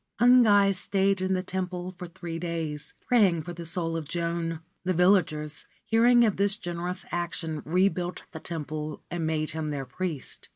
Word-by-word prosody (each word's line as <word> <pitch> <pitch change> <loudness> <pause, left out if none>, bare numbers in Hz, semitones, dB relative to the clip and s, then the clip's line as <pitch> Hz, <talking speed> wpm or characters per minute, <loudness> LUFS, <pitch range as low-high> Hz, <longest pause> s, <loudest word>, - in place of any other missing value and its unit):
Ungai 220 -5 +6
stayed 195 +1 +1
in 185 0 +1
the 185 - -1
temple 185 -1 -3
for 180 0 -7
three 170 -1 -6
days, 165 -3 -4
praying 195 -10 +3
for 175 - -6
the 170 -1 -7
soul 165 -1 -1
of 160 -3 -4
Joan. 170 -1 -2 0.2
The 185 0 0
villagers, 160 -4 +2 0.2
hearing 240 +1 +5
of 210 - 0
this 200 +1 +2
generous 175 -1 -4
action, 170 -3 -3
rebuilt 180 +1 0
the 160 - -7
temple 155 -2 -5
and 170 -2 -1
made 155 -1 0
him 160 -1 -3
their 140 -2 -3
priest. 165 -3 -5
175 Hz, 165 wpm, -27 LUFS, 160-190 Hz, 0.2 s, Ungai